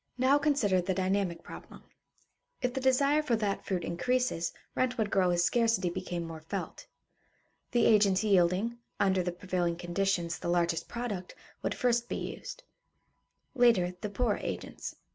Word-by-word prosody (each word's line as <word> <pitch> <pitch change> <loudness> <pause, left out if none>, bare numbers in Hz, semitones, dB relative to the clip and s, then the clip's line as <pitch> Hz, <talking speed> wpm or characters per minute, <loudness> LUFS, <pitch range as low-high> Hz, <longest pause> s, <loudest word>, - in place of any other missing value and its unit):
Now 265 +3 +4
consider 260 -11 +2
the 185 +1 -1
dynamic 190 -2 0
problem. - - -11 0.8
If 250 -1 -1
the 265 - -2
desire 275 +3 +3
for 255 -6 +1
that 210 -3 -1
fruit 180 -3 -1
increases, 245 -1 0 0.2
rent 255 0 0
would 215 -3 0
grow 185 -2 +3
as 175 0 +2
scarcity 225 -4 +2
became 175 -1 -4
more 165 -1 -8
felt. 180 +4 -6 0.8
The 240 -1 +2
agents 200 -3 +4
yielding, 200 +4 +2 0.2
under 190 -2 +3
the 180 0 -2
prevailing 175 -1 -1
conditions, 175 0 -1
the - - -3
largest 170 -1 +1
product, 215 -7 -5 0.3
would - - -2
first 240 -1 +1
be - - -2
used; - - -6 0.9
later, 230 -9 +4
the 210 - -3
poorer 215 +1 0
agents. - - -5
195 Hz, 150 wpm, -30 LUFS, 175-240 Hz, 0.9 s, Now